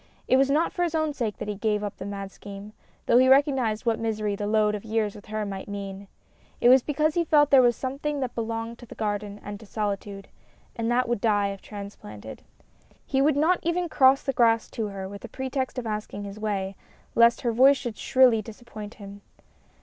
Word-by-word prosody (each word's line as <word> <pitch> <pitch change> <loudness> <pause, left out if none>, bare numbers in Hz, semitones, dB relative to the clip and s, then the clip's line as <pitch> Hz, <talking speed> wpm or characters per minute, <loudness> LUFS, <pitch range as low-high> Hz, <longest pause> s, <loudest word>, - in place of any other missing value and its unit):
It 260 - +4
was 270 0 +3
not 305 +4 +1
for 355 - -3
his 340 -2 0
own 315 -2 0
sake 230 -7 -3
that - - -6
he 210 - -2
gave 210 0 -1
up 205 - -5
the 190 - -6
mad 200 -1 -6
scheme, 200 +1 -10 0.3
though 240 - +5
he 260 0 +5
recognized 265 -5 +3
what 230 -1 +1
misery 215 -2 -1
the 205 +1 -3
load 210 0 +2
of 210 - -5
years 220 -2 -1
with 210 0 -13
her 215 0 -3
might 195 -1 -6
mean; 200 -1 -6 0.5
it 240 - +5
was 260 +1 +7
because 305 +3 0
he 345 - +1
felt 295 -3 +4
there 270 -2 +8
was 240 -1 +4
something 280 +4 -3
that 255 -3 -3
belonged 230 0 -4
to 240 - -12
the - - -11
garden 205 -1 -3
and 205 0 -7
to 220 - -14
solitude, 200 -1 -4 0.5
and 230 0 -2
that 245 +1 +2
would 240 -3 -1
die 205 -3 +2
if 195 -1 -7
transplanted. 110 - -9 0.6
He 270 -1 +1
would 290 0 +3
not 330 +5 +3
even 345 +1 0
cross 270 -2 +4
the 270 - -1
grass 230 -2 +2
to 220 -2 -3
her 195 -2 -6
with 200 0 -10
a - - -6
pretext 265 0 -3
of 250 - -3
asking 210 -1 -4
his 200 +1 -8
way, 200 -2 -2 0.4
lest 235 +1 +5
her 240 - 0
voice 265 +4 +6
should 240 -3 -5
shrilly 255 -4 +4
disappoint 215 -1 -10
him. 200 -1 -11
225 Hz, 220 wpm, -26 LUFS, 205-260 Hz, 0.6 s, there